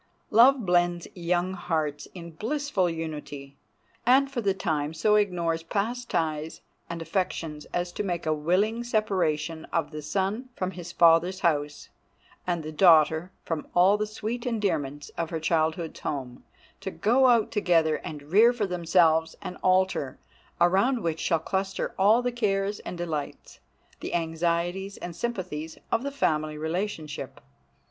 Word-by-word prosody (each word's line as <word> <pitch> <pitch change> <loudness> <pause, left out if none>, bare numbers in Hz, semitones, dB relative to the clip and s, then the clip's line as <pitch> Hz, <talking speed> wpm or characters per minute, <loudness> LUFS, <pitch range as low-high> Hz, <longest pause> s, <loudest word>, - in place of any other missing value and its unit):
Love 240 +2 +6
blends 175 -1 +2
young 180 +1 -1
hearts 160 -5 -2
in 170 -2 -8
blissful 220 - -1
unity, 150 -4 -6 0.5
and 270 +3 +4
for 250 -3 -2
the 200 -3 +2
time 155 -5 -2
so 210 +6 +2
ignores 175 -6 +1
past 225 +8 -3
ties 155 -1 -2 0.3
and 170 -1 -4
affections 165 -5 -3
as 175 0 -3
to - - -4
make 175 -5 -3
a 155 - +2
willing 190 +10 +1
separation 175 -9 0
of 165 -2 -2
the 150 -1 -6
son 195 - -2
from 185 0 -2
his 175 -1 -8
father's 170 +3 +4
house, 150 -4 -1 0.6
and 175 -2 -1
the 155 - -6
daughter 160 0 +5
from 165 -2 -3
all 185 +3 +6
the 210 0 -1
sweet 220 +3 -4
endearments 150 - -2
of 165 -1 -1
her 165 - -3
childhood's 160 0 0
home, 130 -4 -5 0.4
to - - -4
go 255 +5 +3
out 235 -3 +3
together 165 -7 +2
and 150 -2 -8
rear 225 +5 +7
for 240 -4 -1
themselves 170 -3 +2
an 180 - -5
altar, 185 -7 +1 0.4
around 195 +8 +3
which 165 -1 -1
shall 165 - +2
cluster 190 +4 -2
all 215 +5 +5
the 245 - 0
cares 205 -3 -1
and 180 - -7
delights, 160 -4 -5 0.4
the - - -4
anxieties 170 +4 -1
and 175 -1 -7
sympathies 175 -8 -4
of 230 - +2
the 280 - -3
family 155 - 0
relationship. 160 -1 -4
175 Hz, 150 wpm, -27 LUFS, 160-205 Hz, 0.6 s, rear